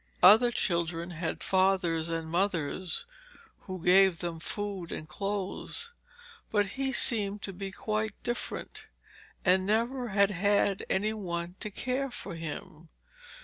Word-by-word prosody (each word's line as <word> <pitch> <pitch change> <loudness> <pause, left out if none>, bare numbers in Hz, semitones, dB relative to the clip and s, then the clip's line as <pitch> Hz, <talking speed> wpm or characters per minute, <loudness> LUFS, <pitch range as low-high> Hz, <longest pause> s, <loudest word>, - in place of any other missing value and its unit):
Other 220 +6 +9
children 170 -5 -1
had 165 -1 -3
their - - -5
fathers 185 -4 +2
and 165 -1 -2
mothers 175 0 -1 0.6
who 185 -3 -6
gave 190 0 +6
them 170 -1 -4
food 195 0 -4
and 155 - -5
clothes, 200 - -3 0.6
but 205 -1 +2
he 270 +2 -1
seemed 210 -6 +2
to 195 - -4
be 195 +1 -5
quite 215 +1 -2
different, 240 0 -4 0.6
and 185 0 +5
never 235 +5 +1
had 200 -1 +3
had 200 +1 +2
any 210 +3 +1
one 175 -4 -4
to 215 - -3
care 255 +6 -2
for 245 - -7
him. 160 0 -7
195 Hz, 135 wpm, -30 LUFS, 170-210 Hz, 0.6 s, Other